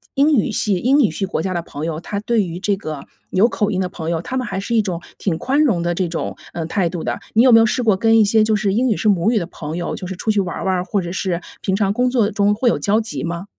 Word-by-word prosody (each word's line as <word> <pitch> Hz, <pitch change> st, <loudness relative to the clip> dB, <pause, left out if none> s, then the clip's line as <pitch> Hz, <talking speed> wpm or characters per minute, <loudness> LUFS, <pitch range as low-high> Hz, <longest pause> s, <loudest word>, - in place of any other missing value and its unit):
英 290 Hz, +3 st, +4 dB
语 225 Hz, -1 st, +1 dB
系 210 Hz, -1 st, 0 dB
英 260 Hz, +10 st, +3 dB
语 240 Hz, -9 st, +4 dB
系 195 Hz, +5 st, -3 dB
国 185 Hz, -, -2 dB
家 185 Hz, +2 st, -2 dB
的 175 Hz, -, -1 dB
朋 150 Hz, -2 st, -7 dB
友， 165 Hz, -1 st, -3 dB
他 200 Hz, +3 st, -4 dB
对 220 Hz, +1 st, +1 dB
于 170 Hz, 0 st, -6 dB
这 200 Hz, +1 st, 0 dB
个 155 Hz, -7 st, -6 dB, 0.3 s
有 200 Hz, +5 st, +4 dB
口 210 Hz, -3 st, -1 dB
音 185 Hz, -, -1 dB
的 185 Hz, -, 0 dB
朋 165 Hz, -2 st, -6 dB
友， 165 Hz, -1 st, -1 dB
他 255 Hz, -, -5 dB
们 255 Hz, -1 st, -1 dB
还 190 Hz, -, -3 dB
是 235 Hz, +4 st, -2 dB
一 225 Hz, -, +5 dB
种 180 Hz, -5 st, -4 dB, 0.2 s
挺 175 Hz, -5 st, -1 dB
宽 275 Hz, -, +1 dB
容 215 Hz, -, +2 dB
的 175 Hz, 0 st, 0 dB
这 180 Hz, -1 st, -1 dB
种， 165 Hz, -, -4 dB, 0.2 s
呃， 165 Hz, -2 st, -4 dB
态 175 Hz, +1 st, 0 dB
度 170 Hz, -1 st, -5 dB
的。 -, -, -1 dB, 0.2 s
你 225 Hz, -, +5 dB
有 255 Hz, -, +6 dB
没 225 Hz, -, +8 dB
有 -, -, +5 dB
试 245 Hz, +2 st, 0 dB
过 220 Hz, -4 st, +3 dB
跟 225 Hz, +3 st, +4 dB
一 215 Hz, -, +5 dB
些 215 Hz, +1 st, +3 dB
就 215 Hz, 0 st, +2 dB
是 205 Hz, -2 st, 0 dB
英 250 Hz, +5 st, +2 dB
语 215 Hz, -, +1 dB
是 -, -, -1 dB
母 200 Hz, +1 st, +3 dB
语 240 Hz, -, +2 dB
的 170 Hz, -, -4 dB
朋 160 Hz, -2 st, -6 dB
友 175 Hz, -, -3 dB
就 -, -, -7 dB
是 185 Hz, 0 st, -6 dB
出 220 Hz, -, -3 dB
去 210 Hz, -2 st, +2 dB
玩 180 Hz, -3 st, -4 dB
玩 190 Hz, -1 st, +1 dB
儿， 180 Hz, -, -1 dB
或 190 Hz, +2 st, -1 dB
者 175 Hz, 0 st, -5 dB
是 185 Hz, -2 st, -1 dB, 0.2 s
平 190 Hz, -, -1 dB
常 200 Hz, -1 st, +1 dB
工 250 Hz, +3 st, +1 dB
作 230 Hz, -5 st, +2 dB
中 205 Hz, -1 st, +2 dB
会 225 Hz, +4 st, -1 dB
有 -, -, +3 dB
交 210 Hz, +2 st, +1 dB
集 225 Hz, 0 st, -5 dB
吗？ 170 Hz, +2 st, -4 dB
200 Hz, 340 characters per minute, -19 LUFS, 175-225 Hz, 0.3 s, 没